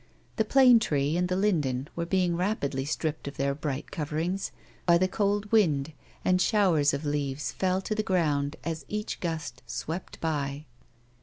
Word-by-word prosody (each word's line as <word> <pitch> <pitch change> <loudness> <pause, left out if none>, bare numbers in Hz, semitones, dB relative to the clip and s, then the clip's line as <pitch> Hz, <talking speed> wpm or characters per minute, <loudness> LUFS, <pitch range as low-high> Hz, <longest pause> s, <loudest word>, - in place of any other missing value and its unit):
The 220 - +2
plane 250 0 +7
tree 145 -6 0
and 180 +1 +1
the 185 - 0
linden 150 -10 +1
were 170 0 -2
being 180 -2 +2
rapidly 170 -8 -1
stripped 155 0 -2
of 140 - -6
their 140 0 +1
bright 145 -1 -4
coverings, 165 +5 -2 0.4
by 170 -1 +7
the 185 +2 +2
cold 205 +1 0
wind 160 -9 +3 0.3
and 185 0 +3
showers 180 -8 +3
of 140 +2 -3
leaves 145 -2 -2
fell 185 0 0
to 215 - -2
the 215 - 0
ground 155 -7 +1
as 160 0 -3
each 210 +1 -4
gust 155 -7 -4
swept 170 +4 -5
by. 145 -2 -2
165 Hz, 165 wpm, -28 LUFS, 145-190 Hz, 0.4 s, plane